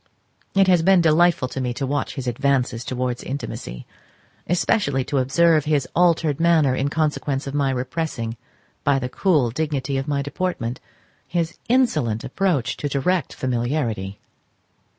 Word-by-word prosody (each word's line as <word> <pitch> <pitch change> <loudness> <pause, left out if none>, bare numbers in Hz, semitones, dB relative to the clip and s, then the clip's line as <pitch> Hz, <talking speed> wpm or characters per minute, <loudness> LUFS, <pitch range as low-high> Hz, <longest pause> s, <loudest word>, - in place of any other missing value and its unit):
It 195 -1 +5
has 180 -3 +5
been 190 +2 +5
delightful 165 -3 +3
to 130 - -4
me 125 -1 -2
to 135 - -2
watch 145 +2 -2
his 135 -3 -5
advances 125 -1 0
towards 125 -1 -2
intimacy, 130 - -6 0.6
especially 160 -5 +1
to 140 +1 -1
observe 155 +4 +3
his 145 -4 +1
altered 165 -4 +3
manner 165 -5 +4
in 135 +2 0
consequence 150 -3 -1
of 140 - -5
my 140 -2 +1
repressing 130 -2 -3 0.5
by 140 -1 +3
the 125 -1 -3
cool 150 - +2
dignity 140 -1 -1
of 135 - -5
my 140 -1 0
deportment 145 -6 -3 0.5
his 170 -1 -2
insolent 225 - +2
approach 140 -2 0
to 145 - -3
direct 160 +6 0
familiarity. 120 -6 -2
140 Hz, 145 wpm, -22 LUFS, 130-165 Hz, 0.6 s, It